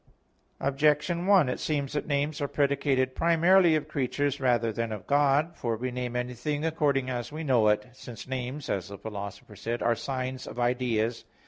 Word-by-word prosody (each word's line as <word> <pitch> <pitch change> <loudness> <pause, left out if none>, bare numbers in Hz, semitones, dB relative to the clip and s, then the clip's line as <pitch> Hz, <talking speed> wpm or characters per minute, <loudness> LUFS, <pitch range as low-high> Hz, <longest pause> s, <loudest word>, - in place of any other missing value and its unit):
Objection 150 +5 +1
1: 195 -8 +6
It 125 - -2
seems 145 -2 -2
that 150 - -2
names 145 +1 -1
are 145 - 0
predicated 140 -2 +1
primarily 170 +2 +4
of 150 -1 -1
creatures 145 0 -1
rather 120 -3 +2
than 115 +1 -3
of 105 -4 -6
God. 145 +3 +2
For 115 -6 -2
we 125 +2 -3
name 125 -1 -4
anything 125 +5 -2
accordingly 140 -5 +1
as 120 +1 -4
we 155 +2 -5
know 125 -7 +3
it, 105 0 +2
since 120 -1 -10
"names", 130 +2 -4
as 95 -3 -2
the 100 0 -8
Philosopher 100 0 -7
says, 115 +4 -3
"are 120 - +2
signs 130 +2 -4
of 120 - -7
ideas." 120 -2 0
130 Hz, 180 wpm, -28 LUFS, 120-145 Hz, -, 1